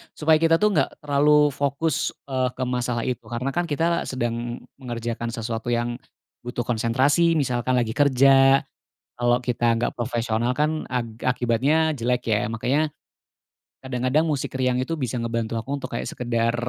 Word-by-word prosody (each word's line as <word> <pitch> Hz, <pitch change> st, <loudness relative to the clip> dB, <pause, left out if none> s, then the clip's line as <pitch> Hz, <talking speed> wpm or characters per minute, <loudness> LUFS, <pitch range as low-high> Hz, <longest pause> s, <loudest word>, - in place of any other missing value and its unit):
supaya 155 Hz, 0 st, +3 dB
kita 165 Hz, 0 st, +4 dB
tuh 210 Hz, +4 st, +2 dB
nggak 155 Hz, -3 st, -1 dB
terlalu 150 Hz, +1 st, +4 dB
fokus, 140 Hz, +2 st, -1 dB
eee, 130 Hz, -2 st, -1 dB
ke 130 Hz, -, -3 dB
masalah 125 Hz, -1 st, -1 dB
itu 125 Hz, -2 st, -3 dB
karena 125 Hz, +3 st, -3 dB
kan 175 Hz, +2 st, -1 dB
kita 165 Hz, +3 st, 0 dB
sedang 120 Hz, -1 st, -3 dB, 0.2 s
mengerjakan 120 Hz, -2 st, -4 dB
sesuatu 115 Hz, 0 st, -4 dB
yang, 120 Hz, +1 st, -1 dB, 0.5 s
butuh 120 Hz, 0 st, -3 dB
konsentrasi 130 Hz, +8 st, +2 dB
misalkan 130 Hz, -3 st, 0 dB
lagi 120 Hz, -3 st, +1 dB
kerja, 135 Hz, +1 st, +5 dB, 0.6 s
kalau 120 Hz, +1 st, +2 dB
kita 120 Hz, -1 st, +1 dB
nggak -, -, 0 dB
profesional 120 Hz, 0 st, -1 dB
kan 155 Hz, +1 st, 0 dB
ak 115 Hz, -3 st, -4 dB
akibatnya 125 Hz, +6 st, +2 dB
jelek 125 Hz, +1 st, 0 dB
ya 105 Hz, 0 st, +1 dB
makanya, 130 Hz, +7 st, 0 dB, 1.0 s
kadang-kadang 130 Hz, +3 st, +1 dB
musik 145 Hz, -3 st, -2 dB
riang 130 Hz, -1 st, +1 dB
itu 130 Hz, +6 st, -1 dB
bisa 130 Hz, -5 st, -3 dB
ngebantu 115 Hz, -1 st, -2 dB
aku 115 Hz, +5 st, -7 dB
untuk -, -, -5 dB
kayak -, -, -3 dB
sekedar, 115 Hz, -1 st, -1 dB
125 Hz, 150 wpm, -24 LUFS, 120-145 Hz, 1.0 s, kerja